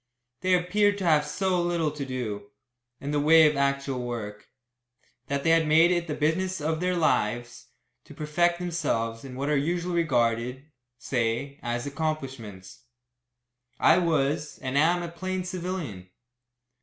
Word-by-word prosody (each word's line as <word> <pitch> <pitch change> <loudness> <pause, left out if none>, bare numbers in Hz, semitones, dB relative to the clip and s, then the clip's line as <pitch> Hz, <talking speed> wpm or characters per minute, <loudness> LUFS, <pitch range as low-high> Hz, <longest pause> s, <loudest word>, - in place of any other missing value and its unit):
They 185 0 +3
appeared 205 +3 +2
to 195 - -4
have 155 -4 +3
so 185 -2 0
little 170 -3 0
to 150 -1 -5
do, 110 -6 -5 0.5
in 140 - -4
the 150 - +1
way 160 +2 +7
of 150 - 0
actual 140 -2 0
work, 105 -3 -6 0.8
that 140 0 -2
they 165 - +3
had 165 -1 +4
made 160 +3 +5
it 175 -1 0
the 150 - -3
business 185 +5 0
of 160 +1 -1
their 180 +1 0
lives 120 -6 0 0.4
to - - -13
perfect 170 +3 +1
themselves 115 -10 -2
in 130 -2 -8
what 140 +2 -3
are 150 - +2
usually 175 +5 -1
regarded, 125 -4 0 0.3
say, 125 +3 -2
as 120 +1 -3
accomplishments. 135 -8 -5 0.9
I 170 - +5
was, 150 -3 0
and 130 0 -5
am, 170 +5 +3
a - - -4
plain 185 +2 -4
civilian. 175 - -5
150 Hz, 150 wpm, -26 LUFS, 125-175 Hz, 0.9 s, way